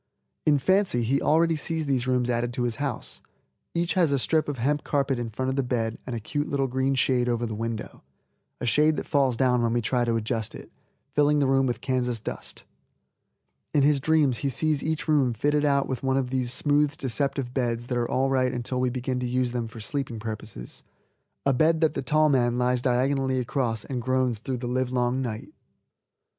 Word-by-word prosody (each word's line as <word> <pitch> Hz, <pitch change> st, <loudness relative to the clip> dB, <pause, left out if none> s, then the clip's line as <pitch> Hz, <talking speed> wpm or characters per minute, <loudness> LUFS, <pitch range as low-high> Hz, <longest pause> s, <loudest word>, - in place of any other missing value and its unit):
In 150 Hz, -1 st, +5 dB
fancy 185 Hz, -, +2 dB
he 135 Hz, +5 st, +1 dB
already 165 Hz, +1 st, +3 dB
sees 160 Hz, +1 st, -2 dB
these 130 Hz, -3 st, 0 dB
rooms 125 Hz, -1 st, +1 dB
added 120 Hz, 0 st, -1 dB
to 120 Hz, -, -1 dB
his 120 Hz, -2 st, -1 dB
house. 140 Hz, -4 st, -4 dB, 0.5 s
Each 170 Hz, 0 st, +1 dB
has 175 Hz, -6 st, +3 dB
a 140 Hz, -, +3 dB
strip 155 Hz, +4 st, +1 dB
of 145 Hz, -, -3 dB
hemp 145 Hz, +5 st, 0 dB
carpet 140 Hz, -3 st, 0 dB
in 120 Hz, -1 st, -3 dB
front 130 Hz, +4 st, -2 dB
of 130 Hz, -, -1 dB
the 135 Hz, -, +2 dB
bed 115 Hz, -3 st, -2 dB
and 125 Hz, -, -3 dB
a -, -, -3 dB
cute 145 Hz, +7 st, -3 dB
little 140 Hz, -1 st, +1 dB
green 130 Hz, +1 st, 0 dB
shade 125 Hz, -1 st, +2 dB
over 120 Hz, 0 st, 0 dB
the 110 Hz, -, -4 dB
window, 115 Hz, 0 st, -5 dB, 0.6 s
a -, -, -3 dB
shade 150 Hz, +6 st, +3 dB
that -, -, -4 dB
falls 135 Hz, -5 st, +2 dB
down 125 Hz, -2 st, +3 dB
when 115 Hz, -1 st, +1 dB
we 120 Hz, -, +2 dB
try 125 Hz, +3 st, +1 dB
to 115 Hz, -1 st, 0 dB
adjust 110 Hz, -1 st, -2 dB
it, -, -, -11 dB, 0.4 s
filling 150 Hz, 0 st, +3 dB
the 145 Hz, -, +3 dB
room 135 Hz, 0 st, +3 dB
with 120 Hz, -, -2 dB
Kansas 125 Hz, -3 st, -1 dB
dust. -, -, -7 dB, 1.1 s
In 145 Hz, -, +5 dB
his 145 Hz, 0 st, +4 dB
dreams 145 Hz, -3 st, +2 dB
he 140 Hz, -, -1 dB
sees 150 Hz, +2 st, 0 dB
each 160 Hz, 0 st, -2 dB
room 140 Hz, -6 st, +2 dB
fitted 145 Hz, +5 st, +1 dB
out 140 Hz, -1 st, +2 dB
with 130 Hz, -3 st, -3 dB
one 135 Hz, 0 st, +1 dB
of 130 Hz, -2 st, -1 dB
those 130 Hz, -2 st, 0 dB
smooth, 145 Hz, +1 st, +2 dB
deceptive 135 Hz, 0 st, -2 dB
beds 120 Hz, -3 st, -1 dB
that 125 Hz, 0 st, -2 dB
are 120 Hz, -, -1 dB
all 135 Hz, +1 st, +1 dB
right 130 Hz, -1 st, +2 dB
until 125 Hz, +1 st, -2 dB
we 130 Hz, -, +2 dB
begin 125 Hz, 0 st, -2 dB
to 125 Hz, -, -2 dB
use 125 Hz, 0 st, 0 dB
them 120 Hz, -2 st, -2 dB
for 115 Hz, +1 st, -11 dB
sleeping 135 Hz, +1 st, -3 dB
purposes, 110 Hz, -, -7 dB, 0.6 s
a 140 Hz, -, +4 dB
bed 160 Hz, +5 st, +3 dB
that 160 Hz, -2 st, +3 dB
the -, -, -2 dB
tall 155 Hz, +3 st, +3 dB
man 120 Hz, -4 st, +2 dB
lies 125 Hz, 0 st, +1 dB
diagonally 130 Hz, +1 st, +1 dB
across 120 Hz, -3 st, -1 dB
and 125 Hz, -3 st, -3 dB
groans 130 Hz, -2 st, 0 dB
through 130 Hz, +3 st, -3 dB
the 120 Hz, 0 st, -5 dB
livelong 125 Hz, 0 st, 0 dB
night. 110 Hz, -4 st, -5 dB
130 Hz, 210 wpm, -26 LUFS, 120-140 Hz, 1.1 s, In